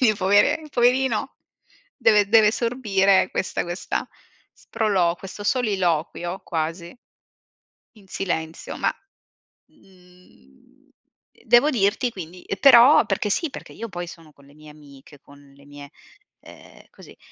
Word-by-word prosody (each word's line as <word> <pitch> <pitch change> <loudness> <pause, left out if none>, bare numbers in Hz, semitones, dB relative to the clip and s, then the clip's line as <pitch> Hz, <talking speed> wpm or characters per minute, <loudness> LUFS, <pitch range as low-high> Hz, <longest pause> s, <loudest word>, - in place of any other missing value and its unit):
quindi 220 -5 +3
povere 205 +10 +2
poverino, 255 +2 0 0.6
deve 210 -5 +3
deve 215 -1 +5
sorbire 210 -6 +1
questa 185 - -3
questa 175 +2 -4 0.4
sprolo 195 -6 -1
questo 195 +2 -10
soliloquio 185 - -1
quasi 165 +3 -5 1.0
in 210 -4 -20
silenzio, 165 -4 -5
ma, - - -1 0.7
mhmm, 180 - -25 0.6
devo 240 +6 +4
dirti 225 +1 0
quindi 180 -2 -10
ehm, 195 - -6
però 275 +3 +7
perché 210 - -2
sì, 325 - -1
perché - - -11
io 230 - -8
poi 175 -2 -6
sono 165 -3 -14
con 140 -1 -22
le 140 - -20
mie 155 0 -16
amiche, 145 -1 -17
con 140 +1 -19 0.2
le 140 0 -20
mie 145 0 -12 0.5
ehm, - - -16
così, - - -17
190 Hz, 125 wpm, -22 LUFS, 165-225 Hz, 1.0 s, però